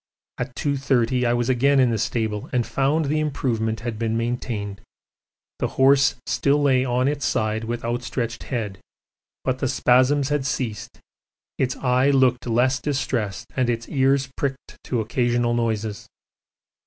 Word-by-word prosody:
At 125 0 -4
2.30 130 -3 +1
I 120 - +2
was 120 -1 0
again 135 +2 +3
in 125 -2 +4
the 110 - -1
stable 110 -1 -2
and 120 -2 +1
found 145 +4 +1
the 150 +2 0
improvement 115 -7 -1
had 115 -2 -4
been 115 -1 0
maintained; 115 -4 -3 0.8
the - - 0
horse 135 0 +5
still 145 +1 +2
lay 135 -3 +3
on 125 0 +1
its 145 -1 -1
side 110 -2 0
with 120 +1 -4
outstretched 120 -1 -3
head, 105 -6 -4 0.6
but 130 0 -1
the 130 - 0
spasms 130 +3 +3
had 145 -2 0
ceased, 125 -4 -4 0.6
its 130 -1 0
eye 130 +1 +2
looked 130 -3 +3
less 125 +3 +2
distressed, 125 -9 -2
and 130 -2 +1
its 115 -1 -2
ears 135 -1 +2
pricked 135 -1 -4
to 120 -3 -1
occasional 120 +1 0
noises. 110 -3 -2
125 Hz, 150 wpm, -23 LUFS, 115-135 Hz, 0.8 s, horse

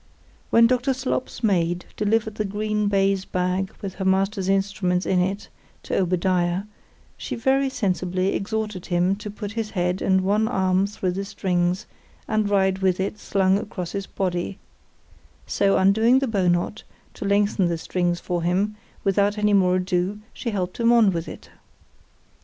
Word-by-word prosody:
When 230 0 +6
Dr. 250 +2 +2
Slop's 255 -2 -3
maid 175 -4 +1
delivered 215 +1 0
the 215 - -2
green 210 +1 -1
baize 195 -1 +2
bag 185 +1 -1
with 195 -2 -4
her - - +1
master's 190 +1 +1
instruments 195 -2 0
in 185 - +2
it, 190 +3 -1 0.4
to - - -3
Obadiah, 180 0 +1 0.5
she - - -5
very 265 +3 +2
sensibly 185 -4 -1
exhorted 210 -2 -3
him 180 +1 +2
to 210 0 -7
put 205 0 -6
his 225 -1 -3
head 180 -1 -1
and 190 0 +3
one 205 +3 +2
arm 190 -3 +1
through 190 -3 -2
the 195 +2 -3
strings, 180 -2 -1 0.4
and 215 -2 +1
ride 190 -1 +2
with 190 -1 +1
it 195 +2 -2
slung 190 0 +2
across 180 -5 -6
his 200 -1 -4
body: 185 0 -2 0.9
so 200 -1 +2
undoing 220 +6 +4
the 270 0 +1
bow 200 -5 +1
knot, 175 +4 0 0.3
to - - -7
lengthen 200 -1 +2
the 170 -1 -1
strings 175 +1 -1
for 175 -1 -2
him, 190 +5 0 0.3
without 200 +1 +2
any 210 0 +2
more 185 -2 +4
ado, 185 +2 -1
she 240 - -4
helped 185 -3 -3
him 230 0 +4
on 230 -4 +5
with 170 -1 -3
it. - - -10
195 Hz, 165 wpm, -23 LUFS, 180-210 Hz, 0.9 s, When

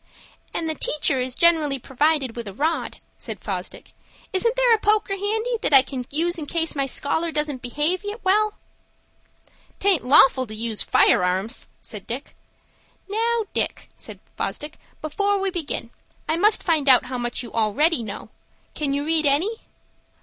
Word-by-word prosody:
"And 330 - -2
the 315 - 0
teacher 290 -3 0
is 255 0 -2
generally 320 -5 +3
provided 270 0 0
with 235 -2 -6
a 195 - -8
rod," 315 +6 -1 0.2
said - - -6
Fosdick. - - -6 0.4
"Isn't 460 +6 +2
there - - +4
a 445 - +3
poker 420 -1 +1
handy, 440 +5 -1
that 285 - +3
I 265 - +9
can 260 -2 -6
use 340 +4 -1
in 295 - -6
case 330 0 -1
my 275 -1 0
scholar 320 +5 -1
doesn't 300 -4 -2
behave 300 +10 -1 0.2
well?" 420 +3 +2 1.2
"'Taint 385 -6 +2
lawful 260 -1 +5
to 215 - -8
use 225 -1 -2
fire - - +3
arms," 190 +7 -1
said 210 -3 -8
Dick. 255 +5 -6 0.7
"Now, 455 +3 0
Dick," - - -2
said - - -9 0.2
Fosdick, 300 +1 -5 0.2
"before 400 +6 0
we 390 0 -1
begin, 335 -5 -4 0.4
I 315 - +1
must 415 +6 +3
find 310 -5 +2
out 255 - +6
how 250 0 -4
much 240 +1 -2
you 235 - -10
already 245 +8 +2
know. 210 -3 -7 0.4
Can 280 -2 -1
you 285 +1 -2
read 315 -1 +2
any?" 350 +11 +1
300 Hz, 165 wpm, -23 LUFS, 260-375 Hz, 1.2 s, I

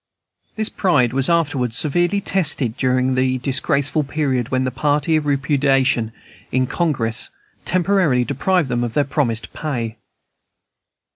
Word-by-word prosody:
This 215 0 -1
pride 145 - +1
was 135 +2 +1
afterwards 145 -8 0
severely 175 +7 +1
tested 150 - +2
during 130 0 +1
the 130 0 +1
disgraceful 140 +3 0
period 135 -5 -1
when 130 0 0
the 130 - -1
party 145 +4 0
of 155 -1 0
repudiation 135 -4 +1 0.4
in 130 0 +1
Congress 125 -7 -1 0.4
temporarily 180 -8 +2
deprived 155 +5 0
them 120 -1 -1
of 120 -2 -4
their 145 - +3
promised 120 -6 -2
pay. 120 -7 -4
135 Hz, 130 wpm, -20 LUFS, 125-155 Hz, 0.4 s, their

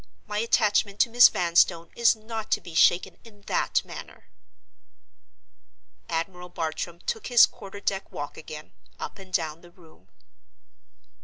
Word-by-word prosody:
My 210 0 -3
attachment 210 -3 +1
to 235 - +2
Miss 245 +1 +8
Vanstone 170 -1 +2
is 235 -1 +4
not 220 0 -7
to - - +1
be 170 - -12
shaken 175 +2 +3
in 210 -3 -17
that - - 0
manner." - - -11 1.8
Admiral 180 +2 -4
Bartram 165 +1 -4
took 450 -3 -4
his 245 -2 +7
quarter 200 +1 -11
deck 195 -1 -3
walk 145 0 -6
again, 155 -1 -10 0.3
up - - -7
and 190 -1 -13
down 160 -3 -2
the 175 - -16
room. 165 - -21
185 Hz, 140 wpm, -26 LUFS, 165-215 Hz, 1.8 s, Miss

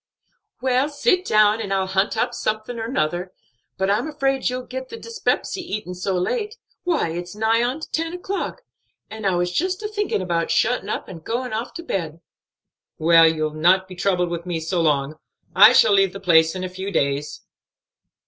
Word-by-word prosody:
Well, 260 +2 +1
sit 365 +5 +1
down, 215 - +4
and 200 -3 -5
I'll 190 -1 +1
hunt 190 +3 0
up - - 0
something 215 +2 -3
or 225 - -3
'nother. 180 - -1 0.5
But 190 +1 +1
I'm 215 +8 0
afraid 270 -3 0
you'll 250 0 -4
get 260 0 -7
the 460 - -7
dyspepsy 455 -4 -2
eatin' 210 - -5
so 185 +1 -2
late; 425 - -2 0.3
why, 335 - 0
it's 175 +3 -6
nigh 220 +2 +2
on 255 +6 -1
to - - -8
ten 330 +1 -1
o'clock; 385 +7 -4 0.5
and 220 -2 -3
I 190 - +2
was 175 0 0
just 370 - -1
a - - -1
thinking' 415 - -1
about 170 -2 -1
shutting' 200 +5 +1
up - - -3
and 165 -4 -10
going 245 +3 -3
off 225 +3 -4
to 335 - -6
bed." 165 - -3 0.8
"Well, 165 0 +6
you'll 155 -1 -2
not 180 +4 +3
be 185 - -10
troubled 180 -1 0
with 170 +1 -5
me 170 -2 -2
long. 155 -3 +1 0.4
I 210 +4 +9
shall 225 -4 +5
leave 195 -2 +3
the 195 - -7
place 165 -3 +4
in 185 - -4
a - - -2
few 190 +2 -5
days." 145 -4 -1
200 Hz, 190 wpm, -22 LUFS, 175-255 Hz, 0.8 s, I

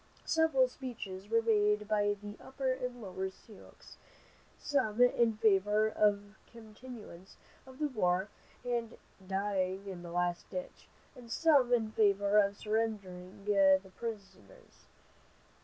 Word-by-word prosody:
Several 320 -6 +3
speeches 210 -7 -8
were 230 0 +2
made 210 -2 +2
by 205 -1 +1
the 205 0 -8
Upper 265 -1 -2
and 250 -2 -5
Lower 190 0 -4
Sioux, 205 +2 -16 0.9
some 245 -6 -1
in 235 -3 +4
favor 210 0 +3
of 205 -1 +1
continuance 220 -4 -12 0.3
of 260 0 -13
the 300 0 0
war 190 -7 0 0.4
and 235 -2 -2 0.3
"dying 195 -1 -1
in 185 -3 -6
the 175 - -9
last 175 0 -1
ditch," 275 - -7 0.3
and 245 -2 -13
some 285 -6 +4
in 225 -3 +2
favor 205 -1 +3
of 200 0 +2
surrendering 200 -4 -3
the 195 -2 +5 0.2
prisoners. 230 - -9
210 Hz, 125 wpm, -32 LUFS, 195-240 Hz, 0.9 s, the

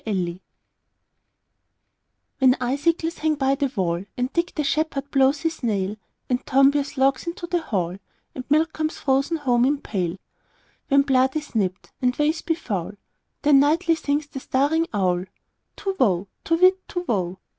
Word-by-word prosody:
Winter 180 -5 -2 2.0
WHEN 260 -1 +5
icicles 320 +6 0
hang 310 0 +1
by 270 -1 +1
the 280 0 0
wallAnd 200 +3 -3
Dick 340 +1 0
the 300 - 0
shepherd 280 -1 -1
blows 275 +1 +3
his 325 -1 -2
nail, 205 -4 -1 0.3
And 250 -1 -1
Tom 275 +1 +5
bears 285 0 -2
logs 270 +3 +2
into 340 0 -4
the 345 0 -1
hall, 185 - -2 0.4
And 255 - -6
milk 315 +2 +3
comes 315 0 -2
frozen 275 +4 +1
home 245 -5 +2
in 285 +3 +2
pail; 185 -8 -3 0.7
When 275 0 +4
blood 265 0 +2
is 305 -1 -4
nipt, 190 -4 -2
and 250 -1 +1
ways 305 +2 +1
be 330 - 0
foul, 205 - -4 0.5
Then 290 -2 +6
nightly 330 +5 +3
sings 295 -2 -1
the 280 -2 -8
staring 290 +6 +1
owlTu 190 - -4
whoo! 195 -6 +2 0.2
To 330 - +2
whit, 370 +2 +3
Tu 355 0 -4
whoo! 185 -4 -1
275 Hz, 155 wpm, -23 LUFS, 220-310 Hz, 2.0 s, Then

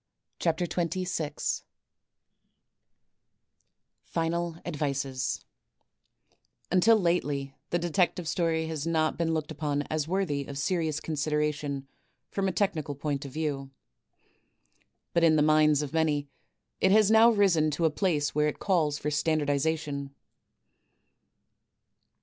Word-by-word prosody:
CHAPTER 165 +1 +1
xx^^ 170 -3 -2 2.4
FINAL 170 0 -2
ADMCES 140 -5 -2 1.3
Until 215 +5 +5
Idtely 145 -6 0 0.2
the 175 - +1
Detective 175 0 0
Ston 160 -2 0
has 160 -1 -4
not 160 -1 +1
been 165 -1 0
looked 155 -1 -3
upon 145 -2 -1
OS 155 -1 -1
worthy 165 -6 -1
of 140 - -6
serious 160 0 0
consideration 150 -2 -2 0.4
from 195 -1 0
a - - +1
technical 160 -6 -1
point 145 0 -3
of 135 - -9
Wew. 145 -4 -2 1.4
But 170 - +2
in 160 -1 +6
the 150 - +4
minds 155 -1 +4
of 145 - -6
many 150 -3 +1 0.5
it 190 - +3
has 215 0 +5
now 225 +1 +7
risen 190 -8 +3
to 155 +3 0
a 160 - +3
place 150 -4 0
where 150 0 +2
it 150 - -2
cills 160 -7 +1
tor 150 - -2
standardization. 145 -1 -1
155 Hz, 115 wpm, -28 LUFS, 145-170 Hz, 2.4 s, now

